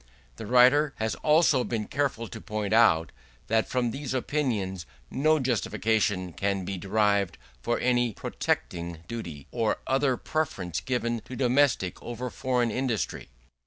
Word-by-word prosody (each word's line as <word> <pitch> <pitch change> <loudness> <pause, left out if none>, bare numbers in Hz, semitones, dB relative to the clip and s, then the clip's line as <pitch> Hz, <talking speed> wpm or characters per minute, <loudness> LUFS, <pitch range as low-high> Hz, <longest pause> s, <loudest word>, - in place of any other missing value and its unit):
The 110 - -7
writer 130 +5 +5
has 110 0 -1
also 150 -4 +4
been 110 -4 -2
careful 135 -5 -1
to 110 - -9
point 105 -1 -3
out, 85 -8 +4 0.4
that 110 0 +2
from 125 -2 0
these 135 +1 -4
opinions 110 - -1 0.2
no 155 +4 +3
justification 110 - 0
can 100 0 -1
be 95 - -3
derived 100 0 +1 0.2
for 120 - 0
any 120 -1 +2
protecting 85 -4 -3
duty, 85 - -6
or 115 -3 0
other 135 -1 +2
preference 95 - -2
given 120 +2 -1
to 130 - -8
domestic 125 -6 +2
over 120 +1 -5
foreign 125 -3 0
industry. 120 -3 -2
115 Hz, 135 wpm, -27 LUFS, 100-130 Hz, 0.4 s, writer